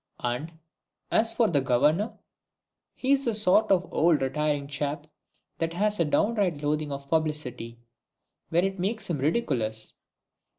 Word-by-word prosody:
And, 125 Hz, +7 st, -2 dB, 0.6 s
as 225 Hz, +1 st, +3 dB
for 230 Hz, -1 st, +2 dB
the 145 Hz, -7 st, +2 dB
Governor, 150 Hz, -, +2 dB, 0.8 s
he's 275 Hz, +1 st, +1 dB
the 230 Hz, -3 st, +1 dB
sort 210 Hz, 0 st, +3 dB
of 185 Hz, -1 st, +3 dB
old 165 Hz, -1 st, +4 dB
retiring 145 Hz, +1 st, 0 dB
chap 145 Hz, +1 st, -3 dB, 0.5 s
that 165 Hz, 0 st, -1 dB
has 210 Hz, +3 st, 0 dB
a 170 Hz, -, +3 dB
downright 185 Hz, -2 st, +1 dB
loathing 150 Hz, 0 st, -1 dB
of 140 Hz, 0 st, -6 dB
publicity, 150 Hz, -7 st, -2 dB, 0.7 s
when 175 Hz, +3 st, +2 dB
it 195 Hz, -1 st, -3 dB
makes 200 Hz, +1 st, -2 dB
him 150 Hz, -, -1 dB
ridiculous. 120 Hz, -, 0 dB
160 Hz, 135 wpm, -27 LUFS, 145-200 Hz, 0.8 s, old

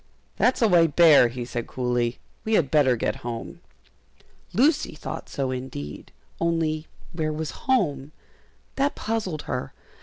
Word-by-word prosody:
"That's 250 Hz, -1 st, +2 dB
a -, -, +6 dB
white 165 Hz, -6 st, +4 dB
bear," 160 Hz, -7 st, +7 dB
he 120 Hz, +1 st, -5 dB
said, 120 Hz, -1 st, -4 dB
coolly; 125 Hz, -1 st, -1 dB, 0.3 s
"we 220 Hz, -, -1 dB
had 145 Hz, -9 st, +2 dB
better 140 Hz, -5 st, +4 dB
get 115 Hz, -, -2 dB
home." 120 Hz, -1 st, -6 dB, 0.9 s
Lucy 300 Hz, +6 st, +2 dB
thought -, -, -7 dB
so 135 Hz, -2 st, -2 dB
indeed; 125 Hz, -, -6 dB, 0.3 s
only 160 Hz, -2 st, 0 dB, 0.3 s
where 155 Hz, -2 st, -1 dB
was 155 Hz, -, -6 dB
home? 150 Hz, -, +1 dB, 0.7 s
that 280 Hz, +1 st, +1 dB
puzzled 200 Hz, -9 st, -3 dB
her. 125 Hz, -, -4 dB
155 Hz, 140 wpm, -25 LUFS, 125-175 Hz, 0.9 s, bear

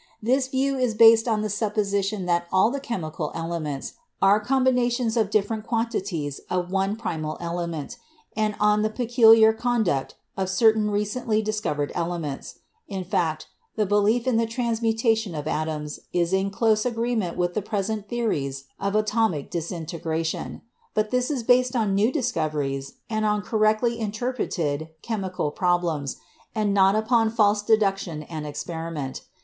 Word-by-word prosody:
This 255 Hz, +4 st, +1 dB
view 270 Hz, 0 st, 0 dB
is 245 Hz, -4 st, +1 dB
based 225 Hz, +1 st, +7 dB
on 215 Hz, -2 st, +1 dB
the 215 Hz, -, -2 dB
supposition 205 Hz, -2 st, -1 dB
that 175 Hz, -1 st, +1 dB
all 190 Hz, +5 st, +4 dB
the 280 Hz, -, -2 dB
chemical 160 Hz, -, -4 dB
elements 165 Hz, -4 st, -4 dB, 0.3 s
are 195 Hz, +2 st, +5 dB
combinations 245 Hz, -1 st, +1 dB
of 220 Hz, -4 st, +2 dB
different 215 Hz, +1 st, 0 dB
quantities 195 Hz, -, -2 dB
of 180 Hz, 0 st, -1 dB
one 195 Hz, +1 st, 0 dB
primal 160 Hz, -9 st, -4 dB
element 170 Hz, -3 st, -4 dB, 0.4 s
and 215 Hz, -1 st, 0 dB
on 210 Hz, 0 st, +3 dB
the 215 Hz, -, +1 dB
peculiar 225 Hz, -1 st, +6 dB
conduct 220 Hz, -, 0 dB, 0.2 s
of 190 Hz, -1 st, -2 dB
certain 215 Hz, +2 st, +3 dB
recently 215 Hz, +2 st, 0 dB
discovered 210 Hz, -9 st, -2 dB
elements; 165 Hz, -5 st, -4 dB, 0.3 s
in 195 Hz, -2 st, -4 dB
fact, 170 Hz, -5 st, -1 dB, 0.3 s
the 215 Hz, -, +1 dB
belief 205 Hz, +4 st, +2 dB
in 255 Hz, -3 st, +2 dB
the 230 Hz, 0 st, +2 dB
transmutation 225 Hz, -3 st, 0 dB
of 150 Hz, 0 st, -4 dB
atoms 155 Hz, -1 st, -3 dB
is 175 Hz, 0 st, 0 dB
in 190 Hz, +1 st, +2 dB
close 215 Hz, +1 st, +2 dB
agreement 230 Hz, -6 st, -1 dB
with 175 Hz, 0 st, 0 dB
the 215 Hz, -, -1 dB
present 205 Hz, 0 st, -3 dB
theories 140 Hz, -, -2 dB, 0.2 s
of 200 Hz, +1 st, -1 dB
atomic 215 Hz, -8 st, +1 dB
disintegra 165 Hz, -1 st, -3 dB
tion, 160 Hz, -, -4 dB, 0.3 s
but 215 Hz, 0 st, 0 dB
this 250 Hz, 0 st, +1 dB
is 270 Hz, -6 st, -2 dB
based 250 Hz, +1 st, +3 dB
upon 215 Hz, -5 st, +1 dB
new 210 Hz, +5 st, +3 dB
discoveries 155 Hz, -, -2 dB
and 215 Hz, -1 st, -1 dB
on 210 Hz, -1 st, +1 dB
cor 220 Hz, -, -2 dB
rectly 220 Hz, +2 st, +2 dB
interpreted 205 Hz, -, -2 dB
chemical 190 Hz, -8 st, -2 dB
problems, 170 Hz, -5 st, 0 dB, 0.4 s
and 210 Hz, -2 st, +1 dB
not 195 Hz, 0 st, +5 dB
upon 225 Hz, +1 st, +2 dB
false 210 Hz, -2 st, +3 dB
de 220 Hz, +1 st, +4 dB
duction 195 Hz, -7 st, -2 dB
and 155 Hz, -2 st, -4 dB
experiment. 155 Hz, -1 st, -5 dB
210 Hz, 150 wpm, -25 LUFS, 170-225 Hz, 0.4 s, based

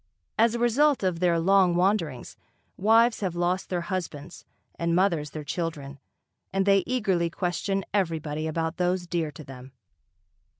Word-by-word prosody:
As 230 Hz, +1 st, +4 dB
a -, -, 0 dB
result 255 Hz, +3 st, +2 dB
of 180 Hz, -3 st, 0 dB
their 175 Hz, -1 st, +2 dB
long 185 Hz, 0 st, +4 dB
wanderings, 175 Hz, -, 0 dB, 0.4 s
wives 225 Hz, +3 st, +4 dB
have 185 Hz, -4 st, -2 dB
lost 175 Hz, +2 st, -1 dB
their 180 Hz, -2 st, -1 dB
husbands 170 Hz, -3 st, -6 dB, 0.3 s
and 170 Hz, 0 st, -1 dB
mothers 170 Hz, -5 st, +1 dB
their 155 Hz, 0 st, -7 dB
children 145 Hz, -4 st, -5 dB, 0.5 s
and 195 Hz, 0 st, 0 dB
they 195 Hz, -1 st, +5 dB
eagerly 195 Hz, -9 st, 0 dB
question 185 Hz, +3 st, -2 dB
everybody 160 Hz, -5 st, -1 dB
about 160 Hz, +1 st, -2 dB
those 180 Hz, 0 st, 0 dB
dear 170 Hz, -2 st, -2 dB
to 150 Hz, +2 st, -11 dB
them. 130 Hz, -1 st, -12 dB
175 Hz, 145 wpm, -26 LUFS, 160-195 Hz, 0.5 s, they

